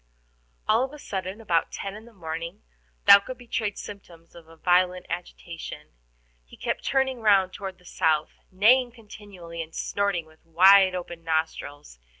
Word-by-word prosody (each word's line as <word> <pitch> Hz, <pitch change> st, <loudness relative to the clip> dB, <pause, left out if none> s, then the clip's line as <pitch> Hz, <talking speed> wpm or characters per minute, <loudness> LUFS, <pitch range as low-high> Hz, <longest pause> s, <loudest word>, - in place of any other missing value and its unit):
All 225 Hz, +3 st, +4 dB
of 265 Hz, +2 st, -5 dB
a -, -, -9 dB
sudden, 190 Hz, -5 st, -5 dB
about 175 Hz, -7 st, 0 dB
ten 195 Hz, -, -5 dB
in 215 Hz, +1 st, -11 dB
the 235 Hz, -, -15 dB
morning, 165 Hz, -, -6 dB, 0.4 s
Thaouka 200 Hz, +6 st, +7 dB
betrayed 230 Hz, -4 st, -3 dB
symptoms 175 Hz, -5 st, -11 dB
of 170 Hz, -2 st, -14 dB, 0.2 s
violent 180 Hz, 0 st, +3 dB
agitation. 170 Hz, -1 st, -7 dB, 0.5 s
He -, -, -17 dB
kept -, -, -3 dB
turning 265 Hz, -2 st, 0 dB
round 195 Hz, -4 st, +4 dB
toward 195 Hz, -2 st, -7 dB
the 180 Hz, -, -24 dB
south, 155 Hz, -3 st, +1 dB, 0.2 s
neighing 240 Hz, +6 st, +4 dB
continually, 200 Hz, -7 st, -10 dB
and 160 Hz, 0 st, -9 dB
snorting 200 Hz, -5 st, -1 dB
with 160 Hz, 0 st, -23 dB
wide 185 Hz, +3 st, +6 dB
open 175 Hz, -2 st, -7 dB
nostrils. 160 Hz, -, -3 dB
185 Hz, 150 wpm, -26 LUFS, 165-210 Hz, 0.5 s, Thaouka